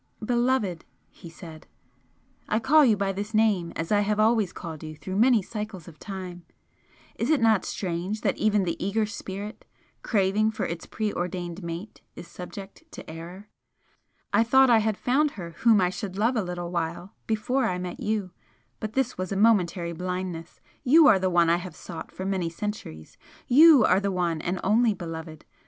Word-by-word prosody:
"Beloved!" 240 -7 0 0.3
he 170 - -12
said 165 -2 -12 0.8
"I 215 - +2
call 295 +7 +5
you 225 -6 +4
by 195 -1 0
this 205 +3 -5
name 205 -6 +2
as 165 +4 -4
I 205 - +4
have 210 +1 0
always 215 -3 +3
called 160 -4 -8
you 155 0 -8
through 185 +5 -6
many 230 -1 +4
cycles 210 -5 -7
of 160 -3 -13
time! 185 -3 -7 0.7
Is 235 - -1
it 310 -3 +4
not 220 -4 +3
strange 185 +3 -3
that - - +1
even 210 -2 +2
the 175 -1 -3
eager 210 +3 0
spirit, 205 0 -7 0.4
craving 210 0 +1
for 220 -1 -3
its 170 0 -5
preordained 180 -4 -3
mate, 170 +4 -7
is 175 - -10
subject 190 - -10
to - - -10
error? 175 +6 -9 0.8
I 225 - +5
thought 265 +2 +5
I 230 - +6
had 215 -1 0
found 285 +4 +1
her 170 -3 -6
whom 225 -3 +5
I 180 -1 +2
should 190 0 -6
love 230 +5 +2
a 225 - +1
little 175 -2 -5
while 170 +2 -3
before 235 +5 0
I 180 - -1
met 180 -1 -6
you 210 -3 -2 0.5
but 215 0 -5
this 255 -5 -1
was 185 +1 -3
a 195 - -1
momentary 180 -5 +2
blindness! 180 -1 -5 0.2
YOU 310 +5 +6
are 195 - +6
the 185 0 +1
one 175 -1 +3
I 170 +1 +3
have 180 +1 -8
sought 165 -2 -9
for 190 - -6
many 190 -3 -1
centuries! 165 - -7 0.3
YOU 290 -2 +7
are 185 - +4
the 200 0 -1
one 175 -4 -1
and 180 +3 -2
only 220 +1 +3
beloved! 160 -3 -8
195 Hz, 180 wpm, -26 LUFS, 175-220 Hz, 0.8 s, YOU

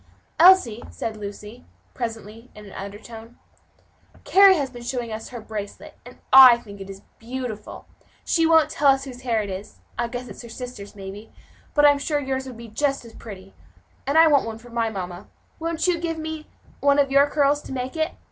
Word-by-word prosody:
"Elsie," 330 - +6
said 220 - -5
Lucy, 210 +3 -9 0.3
presently, 225 -1 -7
in 210 0 -12
an 200 - -12
undertone, 220 +4 -10 0.9
"Carry 390 0 +6
has 280 -5 -2
been 240 -1 -10
showing 240 -1 -4
us 220 +1 -6
her 245 - -7
bracelet, 215 -2 -8
and 245 +1 -14 0.2
I 260 -3 +10
think 200 -4 -12
it 195 - -9
is 195 0 -10 0.2
beautiful; 235 -3 -7 0.4
she 330 -1 +2
won't 320 -1 +4
tell 275 -2 +4
whose 265 -2 -9
hair 230 -4 0
it 200 - -6
is 190 +2 -8 0.2
I 235 - 0
guess 245 +1 -6
it's - - -10
her 235 - -11
sister's, 225 -4 -9
maybe 200 +2 -9 0.4
but 295 -1 +5
I'm 285 -1 +5
sure 295 +1 -1
yours 265 -1 -3
would 250 -3 -9
make 230 -2 -11
just 275 -1 -1
as 230 - -13
pretty 195 -3 -11
a - - -26
bracelet, - - -30
and 280 +3 +1
I 325 - +8
want 290 -6 +3
one 220 -1 -5
for 240 +1 -15
my 230 -1 0
mamma; 180 -4 -7 0.3
won't 330 0 -2
you 355 -2 +1
give 330 -1 -3
me 315 -1 -6 0.3
one 280 0 +3
of 280 -1 +2
your 280 +1 +5
curls 290 0 +2
to - - -11
make 260 +1 -4
it? 315 0 -1
245 Hz, 205 wpm, -23 LUFS, 220-285 Hz, 0.9 s, I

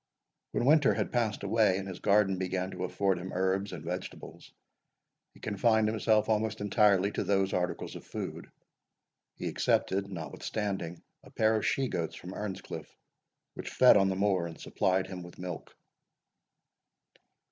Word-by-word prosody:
When - - -1
winter 145 0 +5
had - - -1
passed 115 -5 0
away, 100 -2 +3
and 95 0 -5
his 95 -2 -7
garden 100 -2 +3
began 95 0 -2
to - - -3
afford 95 -3 0
him 95 +2 -6
herbs 95 +2 0
and 85 -4 -7
vegetables, 90 +2 -7 0.8
he - - -16
confined 110 +1 +2
himself 110 0 +2
almost 110 -1 0
entirely 100 -1 +3
to - - -2
those 95 -1 +1
articles 90 -1 -2
of - - -8
food. - - -6 0.9
He - - -4
accepted, 100 +1 +1
notwithstanding, 90 +2 -4 0.2
a - - -14
pair 110 0 +2
of 110 - 0
she 135 -1 +1
goats 85 -8 -3
from 90 +2 -8
Earnscliff, 105 -2 -5 0.7
which - - -6
fed 125 - +6
on 95 -1 +4
the 95 - -1
moor, 95 -3 +1
and 80 - -10
supplied 95 0 0
him 95 -1 -7
with 85 0 -11
milk. 90 -2 -7
95 Hz, 155 wpm, -30 LUFS, 90-105 Hz, 0.9 s, fed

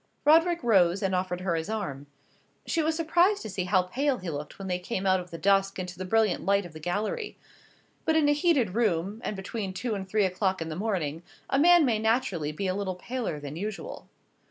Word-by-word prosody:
Roderick 330 +2 +4
rose 195 -4 +3
and 190 -1 0
offered 180 -1 -1
her 185 -2 0
his 160 +2 -2
arm. 145 -11 -4 0.6
She 330 - 0
was 315 +1 0
surprised 345 +5 +2
to 220 - -6
see 185 -1 -2
how 185 -1 +3
pale 265 +8 0
he 185 -3 -5
looked 145 0 -6
when 195 - -7
they 180 -1 -1
came 190 +1 -4
out 190 -1 +4
of 180 0 -8
the 165 - -7
dusk 195 +1 +2
into 180 -1 -5
the 185 +2 -6
brilliant 215 -1 +2
light 200 0 +2
of 170 - -11
the 155 - -9
gallery. 210 - -3 0.7
But 320 - +1
in 310 -2 +4
a 290 - +5
heated 290 - +2
room, 205 -1 0
and 210 - -3
between 195 0 -5
two 230 +5 -3
and 190 -2 -5
three 210 0 +2
o'clock 190 +1 0
in 165 -1 -4
the 155 - -4
morning, 170 -6 -2 0.3
a 270 - +3
man 345 +1 +6
may 230 -4 +1
naturally 215 - 0
be 175 +6 -4
a 185 - +1
little 190 -1 -3
paler 220 -5 -4
than 145 0 -7
usual. 205 +4 -6
195 Hz, 225 wpm, -27 LUFS, 180-235 Hz, 0.7 s, man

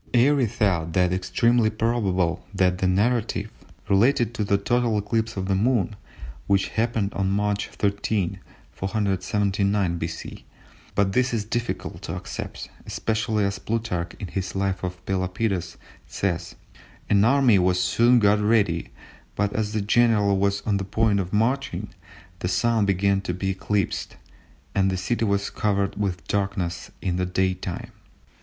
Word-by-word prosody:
Airy 130 +1 +4
thought 90 -6 0
it 90 0 +3
"extremely 110 +5 +2
probable" 100 -6 0
that 90 -1 +2
the 95 - +2
narrative 110 +1 +1 0.4
related 115 +3 +3
to 110 - -1
the 100 0 +2
total 120 +1 +1
eclipse 110 +2 -1
of 95 0 -2
the 100 - +1
Moon, 105 0 +1 0.5
which 100 -1 +2
happened 110 -3 -1
on 95 -1 0
March 105 +1 0
13, 100 -2 -1 0.3
479 100 -1 0
B.C., 80 0 -6 0.5
but 95 -1 +2
this 125 +1 +2
is 105 -2 -2
difficult 120 +2 -3
to - - -5
accept, - - -6 0.2
especially 110 -2 0
as 100 0 -2
Plutarch, 105 -7 -2
in - - -4
his 95 +1 -4
Life 95 -1 -1
of 90 0 -5
Pelopidas, 95 -2 -1 0.3
says—"An 95 +2 -2
army 120 -3 +5
was 90 0 +2
soon 120 +6 +4
got 105 -2 +4
ready, 105 -6 +2 0.5
but 105 0 0
as 105 -1 -1
the 110 - 0
general 105 -2 +3
was 100 0 +1
on 105 -2 0
the 100 - -2
point 105 +1 +1
of 90 -1 -3
marching, 120 +6 0 0.5
the 90 - -2
Sun 105 +4 +2
began 100 0 +2
to 90 -2 -3
be 95 +1 -1
eclipsed, 100 0 -2 0.6
and 95 -1 +2
the 95 - -1
city 115 +5 -1
was 100 -1 0
covered 100 -2 0
with 95 -6 -3
darkness 95 -4 -2
in 90 -2 0
the 90 - 0
daytime." 95 -1 -2
100 Hz, 145 wpm, -24 LUFS, 95-110 Hz, 0.6 s, army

